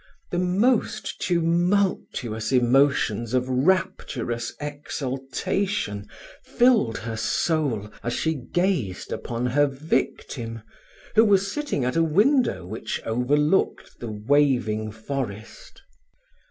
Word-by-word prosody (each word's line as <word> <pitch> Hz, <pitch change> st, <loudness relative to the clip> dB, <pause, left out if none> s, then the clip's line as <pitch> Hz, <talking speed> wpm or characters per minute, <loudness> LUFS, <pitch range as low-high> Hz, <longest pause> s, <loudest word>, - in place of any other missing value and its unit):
The 175 Hz, -, 0 dB
most 215 Hz, +4 st, +1 dB
tumultuous 170 Hz, -, 0 dB
emotions 125 Hz, -2 st, +2 dB
of 125 Hz, 0 st, +1 dB
rapturous 130 Hz, -5 st, 0 dB
exultation 140 Hz, -, -3 dB, 0.4 s
filled 230 Hz, -, +3 dB
her 115 Hz, 0 st, -5 dB
soul 115 Hz, -3 st, 0 dB
as 120 Hz, -, -2 dB
she 160 Hz, +5 st, 0 dB
gazed 145 Hz, -, -1 dB
upon 120 Hz, +1 st, -3 dB
her 145 Hz, +4 st, +3 dB
victim, 125 Hz, -5 st, -3 dB, 0.5 s
who 225 Hz, -, +6 dB
was 195 Hz, -2 st, +3 dB
sitting 290 Hz, -, -2 dB
at 125 Hz, -, -1 dB
a 165 Hz, -, +3 dB
window 200 Hz, -, +2 dB
which 110 Hz, +5 st, -4 dB
overlooked 145 Hz, +9 st, +1 dB
the 120 Hz, -, -5 dB
waving 110 Hz, -2 st, +1 dB
forest. 110 Hz, -2 st, -6 dB
135 Hz, 100 wpm, -24 LUFS, 115-175 Hz, 0.5 s, who